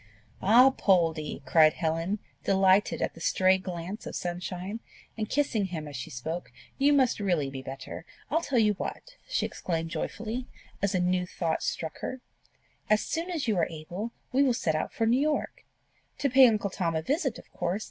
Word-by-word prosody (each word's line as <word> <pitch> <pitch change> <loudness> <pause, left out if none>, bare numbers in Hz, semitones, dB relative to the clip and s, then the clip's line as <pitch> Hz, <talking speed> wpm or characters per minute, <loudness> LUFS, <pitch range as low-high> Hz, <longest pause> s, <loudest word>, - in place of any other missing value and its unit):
"Ah, 245 +7 +7
Poldie!" 165 - +1
cried 155 -2 +6
Helen, 165 +4 -1 0.3
delighted 195 +1 +3
at - - -1
the 165 - -13
stray 185 +2 +3
glance 185 +3 -6
of - - -6
sunshine, 180 +4 -4 0.4
and 215 -1 -3
kissing 265 -8 +1
him 165 -5 -5
as 145 - -8
she 125 - -5
spoke, 160 +6 -5 0.3
"you 280 +2 +5
must 265 -5 +3
really 175 -9 0
be 135 -1 -6
better! 135 +4 -7 0.3
I'll 325 +3 +2
tell 275 -6 -1
you 210 -2 +4
what!" - - -6
she - - +1
exclaimed 165 -2 -3
joyfully, 225 +9 -4 0.3
as 200 0 +1
a - - +2
new 180 0 +1
thought 165 -3 -2
struck 160 -2 -3
her: 260 - -4 0.7
"As 215 0 +4
soon 335 +2 -2
as 320 -8 -2
you 220 - +2
are 165 - +1
able, 175 +8 -6 0.2
we 260 +2 +3
will 260 -4 +3
set 165 -9 0
out 155 - -2
for 225 - 0
New 240 +4 +3
York 300 0 -1 0.5
to 280 - 0
pay 260 0 +8
Uncle 210 -4 0
Tom 170 -3 -1
a 160 - -1
visit 275 - 0
of - - -15
course! 180 +4 -1
190 Hz, 190 wpm, -28 LUFS, 165-240 Hz, 0.7 s, pay